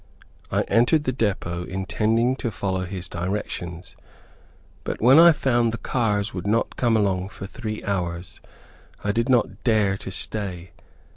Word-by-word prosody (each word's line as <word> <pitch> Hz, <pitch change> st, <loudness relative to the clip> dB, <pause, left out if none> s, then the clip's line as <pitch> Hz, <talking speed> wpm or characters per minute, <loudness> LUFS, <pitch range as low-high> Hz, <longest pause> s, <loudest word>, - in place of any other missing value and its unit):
I -, -, +2 dB
entered 120 Hz, +7 st, +3 dB
the 130 Hz, -, 0 dB
depot 95 Hz, -7 st, -2 dB
intending 110 Hz, +7 st, 0 dB
to 120 Hz, -, -2 dB
follow 95 Hz, -3 st, -2 dB
his 90 Hz, -1 st, -5 dB
directions; 90 Hz, -1 st, -5 dB, 0.9 s
but -, -, -4 dB
when 130 Hz, +7 st, +7 dB
I 170 Hz, +1 st, +9 dB
found 120 Hz, -6 st, +1 dB
the 115 Hz, -, -4 dB
cars 110 Hz, -5 st, -1 dB
would 90 Hz, +1 st, -4 dB
not 115 Hz, +3 st, +1 dB
come 115 Hz, -3 st, +2 dB
along 95 Hz, -2 st, 0 dB
for 95 Hz, -, -8 dB
three 110 Hz, +1 st, -6 dB
hours, 90 Hz, -3 st, -3 dB, 0.6 s
I 100 Hz, -, +1 dB
did 115 Hz, +3 st, 0 dB
not 125 Hz, -2 st, +1 dB
dare 105 Hz, -4 st, +2 dB
to 95 Hz, -, -7 dB
stay. 95 Hz, -3 st, -4 dB
105 Hz, 150 wpm, -24 LUFS, 95-115 Hz, 0.9 s, I